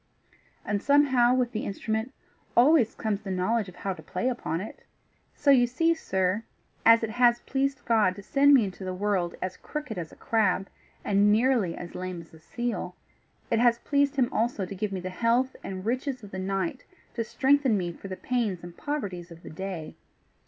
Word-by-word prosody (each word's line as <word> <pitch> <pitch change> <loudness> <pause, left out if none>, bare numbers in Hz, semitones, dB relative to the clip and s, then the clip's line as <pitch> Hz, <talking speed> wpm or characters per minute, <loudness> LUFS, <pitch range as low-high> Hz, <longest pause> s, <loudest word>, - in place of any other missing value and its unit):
And 205 -1 -1
somehow 260 -3 +4
with 250 -2 +1
the 215 - -3
instrument 220 +4 -3 0.5
always 250 -2 +5
comes 215 -2 -2
the 195 - -7
knowledge 190 +3 0
of 180 - -14
how 195 +1 -3
to - - -12
play 255 - -2
upon 200 -9 -3
it. 205 - -8 0.5
So 280 - +3
you 245 -3 +5
see, 330 +7 +2
sir, 190 - -1 0.4
as 230 0 +6
it 220 - -2
has 240 +1 +3
pleased 270 0 -2
God 215 -6 +3
to 200 - -10
send 280 +5 +5
me 250 - +5
into 190 -1 -6
the 185 0 -4
world 185 -3 -1
as 185 0 -4
crooked 260 -10 -5
as 165 -2 -6
a - - -14
crab, 195 -4 +1 0.4
and 205 +1 +4
nearly 225 -5 +2
as 175 - -8
lame 185 -1 -5
as 165 -1 -14
a 160 - -14
seal, 195 -1 -4 0.6
it 230 - +3
has 235 -1 +4
pleased 285 +2 +1
him 255 -3 +1
also 225 -3 0
to 190 - -7
give 200 +1 -3
me 190 -2 -3
the 185 +1 -5
health 235 +6 +1
and 190 0 -6
riches 255 +1 -2
of 205 - -11
the 190 - -5
night 190 -2 -2 0.3
to 230 - -2
strengthen 270 -1 +2
me 175 -2 -2
for 185 - -10
the 185 -1 -6
pains 225 -9 -1
and 175 -1 -10
poverties 200 - -4
of 170 0 -13
the - - -9
day. 175 -2 -6
220 Hz, 200 wpm, -27 LUFS, 185-250 Hz, 0.6 s, as